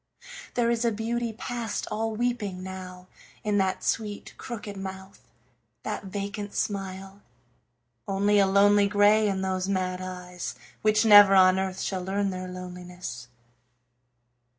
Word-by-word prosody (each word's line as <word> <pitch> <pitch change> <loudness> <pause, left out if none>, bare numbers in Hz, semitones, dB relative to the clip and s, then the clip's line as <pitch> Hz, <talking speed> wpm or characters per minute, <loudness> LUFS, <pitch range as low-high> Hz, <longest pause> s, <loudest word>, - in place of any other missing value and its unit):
There 235 -1 +2
is 235 0 0
a 235 - +2
beauty 230 +2 -2
past 230 0 -4
all 225 0 -2
weeping 215 -6 -2
now 185 -1 -8 0.4
In 210 -1 +1
that 190 -1 0
sweet, 210 -2 -2
crooked 210 -3 -7
mouth, 190 0 -8 0.6
that - - -4
vacant 200 +1 -5
smile; 195 -1 -4 0.9
Only 205 +1 +2
a 195 - +5
lonely 200 +1 +5
grey 210 +1 +4
in 190 -1 -1
those 185 0 -1
mad 185 -1 -1
eyes, 180 -1 -6 0.3
Which 215 +1 +3
never 205 -2 +9
on 185 0 +6
earth 190 -1 -3
shall 190 -2 -2
learn 195 +1 -1
their 185 0 -5
loneliness. 180 -8 -8
195 Hz, 130 wpm, -27 LUFS, 185-210 Hz, 0.9 s, never